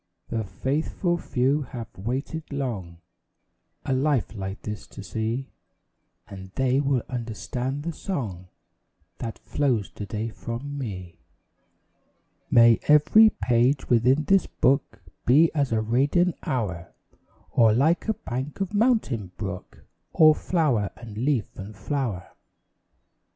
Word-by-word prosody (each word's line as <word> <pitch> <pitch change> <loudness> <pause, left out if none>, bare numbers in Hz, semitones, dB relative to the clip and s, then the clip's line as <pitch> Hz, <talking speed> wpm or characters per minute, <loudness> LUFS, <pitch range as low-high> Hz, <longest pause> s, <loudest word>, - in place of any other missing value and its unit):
The 115 -1 -1
faithful 155 - -1
few 135 +4 +1
have 120 -4 -8
waited 135 - -4
long 100 -12 -4 0.8
A - - 0
life 135 -3 +1
like 95 -2 -6
this 105 -1 -6
to 100 - -10
see; 115 +6 -3 0.8
And 95 -1 -9
they 130 0 +2
will 135 -4 +1
understand 125 +3 -4
the 170 +1 -3
song 105 - -4 0.7
That 115 - -5
flows 125 -9 -1
to 105 - -7
day 110 +4 -3
from 120 +6 -6
me. 95 -10 -6 1.3
May 115 -1 +6
every 150 +9 +7
page 125 +3 +2
within 125 +5 +4
this 195 +4 +3
book 135 -7 0 0.2
Be 150 +7 +6
as 140 -5 0
a 110 -1 +2
radiant 140 +10 +2
hour; 95 -10 -3 0.6
Or 115 -2 +5
like 150 - +2
a 220 - +2
bank 130 +7 -5
of 195 +1 -2
mountain 205 - +1
brook, 100 -3 -7 0.3
All 155 -1 +7
flower 150 - 0
and 115 -3 -10
leaf 125 -1 +1
and 100 +2 -8
flower. 105 -3 -3
125 Hz, 125 wpm, -25 LUFS, 110-145 Hz, 1.3 s, every